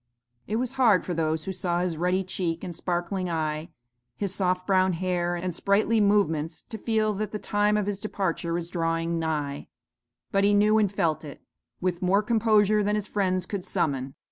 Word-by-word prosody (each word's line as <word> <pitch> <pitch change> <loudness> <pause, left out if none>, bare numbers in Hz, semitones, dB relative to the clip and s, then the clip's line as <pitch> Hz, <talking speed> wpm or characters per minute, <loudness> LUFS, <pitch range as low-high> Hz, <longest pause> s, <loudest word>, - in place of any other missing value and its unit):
It 210 - -2
was 250 +2 -1
hard 215 -7 +5
for 180 - -2
those 160 -1 0
who 190 - -3
saw 175 -1 -1
his 180 -2 -1
ruddy 180 +4 +1
cheek 175 -3 -2
and 175 -2 -5
sparkling 175 +2 -2
eye, 155 0 -2 0.5
his 195 -2 -2
soft 185 -2 0
brown 185 -1 +3
hair, 175 0 -1
and 180 +1 -3
sprightly 210 +5 +2
movements 165 -6 +1
to 220 - -6
feel 215 -1 +1
that 210 +1 -3
the 210 - -3
time 210 0 +1
of 210 - 0
his 200 -1 -3
departure 190 -5 -2
was 170 0 -3
drawing 165 0 -1
nigh: 150 -3 -2 0.6
but 195 0 +2
he 205 0 +4
knew 210 +1 +4
and 205 -3 +2
felt 165 -6 0
it, 145 -2 -10 0.4
with 180 -1 -1
more 195 +3 +3
composure 215 -2 +3
than 210 +1 +1
his 210 -2 -1
friends 185 -3 0
could 195 0 -4
summon. 140 -9 -1
185 Hz, 190 wpm, -26 LUFS, 170-205 Hz, 0.6 s, hard